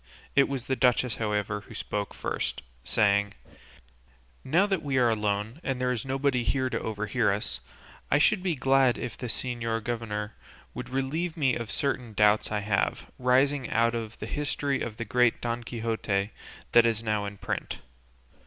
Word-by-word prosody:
It 140 Hz, 0 st, +5 dB
was 135 Hz, -3 st, -2 dB
the 130 Hz, -, 0 dB
duchess, 125 Hz, -2 st, +2 dB
however, 105 Hz, -1 st, -1 dB
who -, -, -11 dB
spoke 105 Hz, -1 st, -3 dB
first, 65 Hz, -, -3 dB, 0.2 s
saying: 100 Hz, -1 st, +2 dB, 1.1 s
"Now 170 Hz, +9 st, +3 dB
that 195 Hz, -4 st, 0 dB
we 140 Hz, -2 st, -1 dB
are 120 Hz, -2 st, +4 dB
alone, 105 Hz, +5 st, -1 dB
and 135 Hz, -2 st, -1 dB
that -, -, -9 dB
there 125 Hz, -, +2 dB
is 120 Hz, -2 st, -2 dB
nobody 135 Hz, -2 st, +1 dB
here 130 Hz, +2 st, 0 dB
to -, -, 0 dB
overhear 105 Hz, +1 st, 0 dB
us, 100 Hz, -11 st, -2 dB, 0.5 s
I 145 Hz, -, +4 dB
should 185 Hz, +6 st, +4 dB
be 180 Hz, -3 st, 0 dB
glad 135 Hz, -2 st, +3 dB
if 110 Hz, -, -5 dB
the 125 Hz, -, -5 dB
señor 115 Hz, -2 st, -2 dB
governor 110 Hz, -2 st, -3 dB, 0.4 s
would -, -, -6 dB
relieve 155 Hz, +6 st, -2 dB
me 135 Hz, -5 st, +3 dB
of 115 Hz, -2 st, -3 dB
certain 125 Hz, -5 st, -1 dB
doubts 105 Hz, +1 st, +3 dB
I 105 Hz, -1 st, 0 dB
have, 100 Hz, -1 st, -1 dB
rising 130 Hz, +1 st, +3 dB
out 115 Hz, +1 st, +3 dB
of 115 Hz, -2 st, -4 dB
the -, -, -5 dB
history 145 Hz, -1 st, -1 dB
of 110 Hz, -2 st, -4 dB
the 115 Hz, -, -3 dB
great 120 Hz, +2 st, +3 dB
Don 120 Hz, 0 st, -2 dB
Quixote 110 Hz, -3 st, -1 dB, 0.4 s
that 120 Hz, 0 st, +7 dB
is 115 Hz, -1 st, -1 dB
now 105 Hz, -2 st, 0 dB
in 100 Hz, 0 st, -6 dB
print. -, -, -3 dB
120 Hz, 175 wpm, -28 LUFS, 105-130 Hz, 1.1 s, that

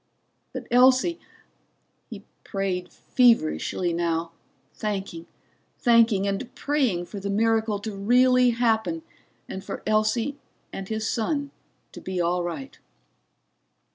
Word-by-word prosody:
But -, -, -6 dB
Elsie 260 Hz, +7 st, +4 dB, 0.9 s
He -, -, -9 dB, 0.2 s
prayed 190 Hz, -3 st, -3 dB
feverishly 185 Hz, -6 st, +2 dB
now, 165 Hz, -1 st, -1 dB, 0.4 s
thanking, 195 Hz, -5 st, -4 dB, 0.5 s
thanking, 230 Hz, -4 st, +4 dB
and 200 Hz, +6 st, -3 dB
praying 255 Hz, -12 st, 0 dB
for 200 Hz, -, -8 dB
the 200 Hz, +1 st, -4 dB
miracle 220 Hz, +1 st, +1 dB
to 205 Hz, 0 st, -6 dB
really 250 Hz, +4 st, +4 dB
happen 235 Hz, +6 st, 0 dB, 0.4 s
and 190 Hz, -, -6 dB
for -, -, -6 dB
Elsie 215 Hz, +6 st, +1 dB, 0.3 s
and 195 Hz, 0 st, -6 dB
his 220 Hz, 0 st, -2 dB
son 285 Hz, +5 st, -1 dB, 0.4 s
to -, -, -10 dB
be 185 Hz, -1 st, -4 dB
all 175 Hz, +1 st, +1 dB
right. 270 Hz, +11 st, -6 dB
220 Hz, 110 wpm, -25 LUFS, 190-245 Hz, 0.9 s, Elsie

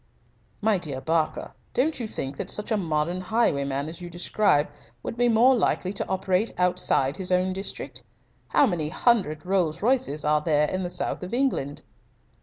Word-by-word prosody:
"My 210 Hz, -2 st, +2 dB
dear 145 Hz, -6 st, -4 dB
Barker, 160 Hz, +2 st, -1 dB, 0.2 s
don't 295 Hz, +4 st, +1 dB
you 235 Hz, -, -3 dB
think 135 Hz, -9 st, -5 dB
that -, -, -4 dB
such 210 Hz, +2 st, -3 dB
a -, -, +4 dB
modern 170 Hz, -1 st, -1 dB
highwayman 140 Hz, -, 0 dB
as 165 Hz, +2 st, -8 dB
you 175 Hz, -, -7 dB
describe 175 Hz, -3 st, +2 dB, 0.4 s
would -, -, -4 dB
be 245 Hz, 0 st, +2 dB
more 240 Hz, +4 st, +5 dB
likely 190 Hz, -4 st, 0 dB
to 195 Hz, -, -4 dB
operate 190 Hz, +3 st, +1 dB
outside 175 Hz, -5 st, +2 dB
his 185 Hz, -2 st, -3 dB
own 185 Hz, +1 st, +2 dB
district? 195 Hz, +1 st, -6 dB, 0.5 s
How -, -, +4 dB
many 170 Hz, -, -1 dB
hundred 180 Hz, -7 st, +1 dB
Rolls 180 Hz, -3 st, 0 dB
Royces 245 Hz, -, +1 dB
are 150 Hz, 0 st, +3 dB
there 150 Hz, -1 st, +2 dB
in 185 Hz, -, -2 dB
the 180 Hz, -, -3 dB
South -, -, -2 dB
of 185 Hz, +6 st, -4 dB
England?" 245 Hz, -, -1 dB
180 Hz, 175 wpm, -26 LUFS, 155-215 Hz, 0.5 s, more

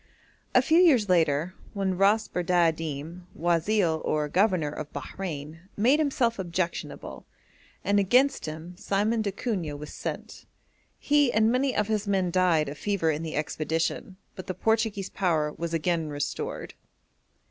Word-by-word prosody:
A -, -, +6 dB
few 320 Hz, +2 st, +4 dB
years 265 Hz, -, +5 dB
later, 165 Hz, -1 st, +2 dB, 0.2 s
one 195 Hz, -2 st, 0 dB
Ras 205 Hz, +4 st, +3 dB
Bardadim, 165 Hz, -1 st, -1 dB
guazil, 170 Hz, 0 st, +1 dB
or 150 Hz, -1 st, 0 dB
governor 180 Hz, -4 st, +2 dB
of 150 Hz, 0 st, -7 dB
Bahrein, 155 Hz, 0 st, -6 dB, 0.2 s
made 255 Hz, +8 st, +4 dB
himself 255 Hz, -7 st, +1 dB
objectionable, 175 Hz, -1 st, -4 dB, 0.6 s
and 205 Hz, 0 st, +2 dB
against 250 Hz, -, +3 dB
him 160 Hz, +3 st, -7 dB
Simeon 210 Hz, +4 st, 0 dB
d'Acunha 195 Hz, -, -3 dB
was 150 Hz, +1 st, -9 dB
sent. -, -, -6 dB, 0.5 s
He 290 Hz, -3 st, +3 dB
and 220 Hz, 0 st, +3 dB
many 260 Hz, +1 st, +1 dB
of 210 Hz, -, +1 dB
his 215 Hz, -1 st, -1 dB
men 190 Hz, -3 st, +1 dB
died 170 Hz, -4 st, +3 dB
of 145 Hz, +1 st, -7 dB
fever 200 Hz, -6 st, +1 dB
in 150 Hz, +1 st, -3 dB
the 160 Hz, -1 st, -5 dB
expedition, 160 Hz, +5 st, -2 dB, 0.2 s
but 185 Hz, -, -9 dB
the 185 Hz, -, -3 dB
Portuguese 220 Hz, -3 st, 0 dB
power 160 Hz, -6 st, 0 dB
was 170 Hz, 0 st, -4 dB
again 165 Hz, -1 st, 0 dB
restored. 145 Hz, 0 st, -4 dB
180 Hz, 140 wpm, -27 LUFS, 160-210 Hz, 0.6 s, A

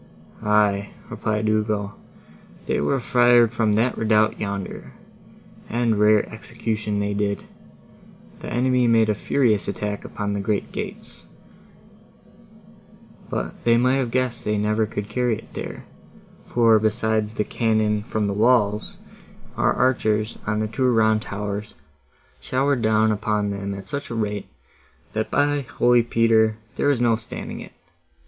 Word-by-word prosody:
"Aye," 105 Hz, -1 st, +2 dB, 0.2 s
replied 110 Hz, 0 st, -1 dB
Ugo, 105 Hz, -1 st, 0 dB, 0.7 s
"they -, -, 0 dB
were 135 Hz, -, +1 dB
fired 120 Hz, -1 st, +4 dB
from 115 Hz, -3 st, +1 dB
that 115 Hz, +4 st, +1 dB
redoubt, 110 Hz, -1 st, +2 dB
yonder, 100 Hz, -2 st, -5 dB, 0.8 s
and 115 Hz, -2 st, +1 dB
rare 105 Hz, 0 st, +4 dB
execution 110 Hz, -1 st, -3 dB
they 100 Hz, 0 st, -1 dB
did. 100 Hz, 0 st, -1 dB, 1.0 s
The -, -, -7 dB
enemy 125 Hz, 0 st, +2 dB
made 115 Hz, -1 st, +4 dB
a -, -, +3 dB
furious 110 Hz, 0 st, +1 dB
attack 105 Hz, 0 st, -3 dB
upon 100 Hz, 0 st, -4 dB
the 100 Hz, -, -2 dB
great 100 Hz, +1 st, -2 dB
gates; -, -, -7 dB, 2.0 s
but -, -, -4 dB
they 115 Hz, 0 st, +4 dB
might 125 Hz, +2 st, +3 dB
have 130 Hz, -3 st, -1 dB
guessed 130 Hz, 0 st, -1 dB
they 105 Hz, -, -1 dB
could 105 Hz, -, 0 dB
never 105 Hz, +1 st, +1 dB
carry 110 Hz, +2 st, -1 dB
it -, -, -15 dB
there; -, -, -7 dB, 0.6 s
for, 115 Hz, -2 st, +4 dB
besides 110 Hz, 0 st, 0 dB
the 105 Hz, -, 0 dB
cannon 110 Hz, -2 st, 0 dB
from 105 Hz, 0 st, -2 dB
the 100 Hz, -, -1 dB
walls, 105 Hz, -1 st, +2 dB, 0.6 s
our -, -, +2 dB
archers, 110 Hz, -4 st, 0 dB
on 105 Hz, 0 st, 0 dB
the 110 Hz, -, -1 dB
two 125 Hz, +4 st, 0 dB
round 110 Hz, -2 st, +3 dB
towers, 105 Hz, 0 st, -5 dB, 0.6 s
showered 130 Hz, -, 0 dB
down 110 Hz, 0 st, +3 dB
upon 105 Hz, -1 st, -1 dB
them 100 Hz, 0 st, -4 dB
at 95 Hz, -1 st, -9 dB
such 140 Hz, +6 st, -5 dB
a 115 Hz, -, -4 dB
rate, 105 Hz, -2 st, -2 dB, 0.7 s
that, 110 Hz, 0 st, -2 dB
by 145 Hz, 0 st, +2 dB
holy 120 Hz, -2 st, +3 dB
Peter! 115 Hz, -2 st, +2 dB, 0.2 s
there -, -, 0 dB
was 140 Hz, -4 st, +2 dB
no 115 Hz, -2 st, +4 dB
standing 110 Hz, 0 st, -7 dB
it. -, -, -11 dB
110 Hz, 140 wpm, -23 LUFS, 105-120 Hz, 2.0 s, fired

